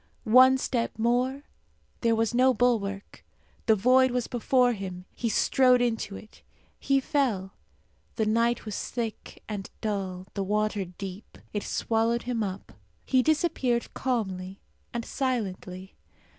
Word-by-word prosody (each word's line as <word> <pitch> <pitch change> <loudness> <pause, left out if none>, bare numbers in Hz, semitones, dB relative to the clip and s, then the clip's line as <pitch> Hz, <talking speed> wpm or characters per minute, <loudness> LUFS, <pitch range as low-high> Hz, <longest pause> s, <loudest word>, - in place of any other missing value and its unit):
One 255 +3 +7
step 240 -4 -2
more; 250 +4 +1 0.6
there 230 -1 +2
was 225 0 0
no 255 +1 +4
bulwark; 210 -4 -1 0.4
the 220 - +6
void 255 +5 +4
was 245 -1 -1
before 245 +1 +2
him; 185 -3 -6
he 235 - -2
strode 255 +2 +4
into 225 -4 -1
it. 215 - -13 0.4
He 275 -1 +2
fell. 255 -10 -1 0.6
The 220 - +1
night 230 +2 +1
was 215 -3 -4
thick 230 -3 -5
and 205 -3 -5
dull, 190 -4 -3
the 200 - -3
water 210 0 0
deep. 185 +3 -9 0.2
It 205 - -1
swallowed 230 +2 0
him 240 -2 -2
up. 195 -2 -4 0.3
He 260 -1 +3
disappeared 280 -5 0
calmly 195 -7 -2 0.3
and 235 -1 -4
silently. 190 -8 -3
230 Hz, 130 wpm, -27 LUFS, 200-250 Hz, 0.6 s, One